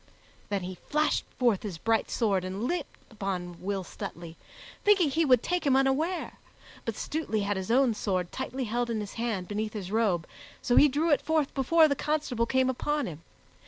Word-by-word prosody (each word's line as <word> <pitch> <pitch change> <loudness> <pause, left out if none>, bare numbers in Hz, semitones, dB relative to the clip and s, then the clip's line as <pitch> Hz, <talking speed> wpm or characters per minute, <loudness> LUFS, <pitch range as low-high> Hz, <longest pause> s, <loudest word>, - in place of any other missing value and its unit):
Then 200 -2 -1
he 180 0 -6
flashed 300 +1 +1
forth 235 -6 +2
his 195 -6 -5
bright 225 +5 +1
sword 200 -6 +1
and 190 +3 -4
leaped 325 +3 -2
upon 185 -5 -4
Will 195 0 -2
Stutely, 170 -1 -8 0.5
thinking 385 -8 +4
he 325 +3 +2
would 255 -4 +4
take 355 0 0
him 275 -3 +3
unaware; 270 +7 0 0.5
but - - -2
Stutely 295 -9 -2
had 200 0 0
his 190 +1 -4
own 250 0 +4
sword 185 -4 -2
tightly 260 0 -4
held 240 +1 -1
in 225 -2 -1
his 205 -1 -6
hand, 225 -6 -2
beneath 215 +1 -3
his 195 -3 -5
robe, 205 -7 +1 0.3
so 245 - +1
he 295 - +8
drew 300 +4 +1
it 290 - +4
forth 315 -3 0
before 315 +4 +5
the 285 - +1
constable 290 -6 -1
came 260 +1 +2
upon 290 +3 0
him. 160 -3 -7
235 Hz, 190 wpm, -28 LUFS, 195-285 Hz, 0.5 s, he